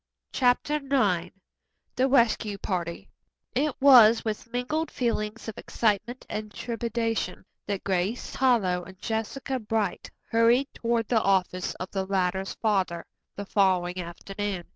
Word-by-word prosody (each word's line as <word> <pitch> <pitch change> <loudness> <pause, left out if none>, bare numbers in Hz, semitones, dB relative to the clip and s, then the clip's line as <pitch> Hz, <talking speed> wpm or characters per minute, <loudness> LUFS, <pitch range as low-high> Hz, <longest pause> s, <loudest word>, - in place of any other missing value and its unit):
CHAPTER 255 +4 +2
IX 215 - +1 0.7
THE 260 - +3
RESCUE 230 -5 +2
PARTY 175 -4 -4 0.4
It 285 +1 0
was 235 -5 +7
with 220 +1 -4
mingled 295 +6 -1
feelings 230 -3 -2
of 220 - -6
excitement 225 +3 -1
and 215 0 -5
trepidation 230 -4 -3 0.2
that 200 -2 -3
Grace 190 +5 -1
Harlowe 210 -9 +2
and 190 +1 -12
Jessica 230 +6 -3
Bright 215 -3 -2 0.2
hurried 235 +4 +4
toward 230 -2 -1
the 225 -3 +2
office 185 -2 0
of 185 - -7
the 190 -1 -2
latter's 190 0 -1
father 190 -6 0 0.3
the 200 - -5
following 185 -3 +1
afternoon. 195 +2 -5
215 Hz, 125 wpm, -27 LUFS, 190-240 Hz, 0.7 s, was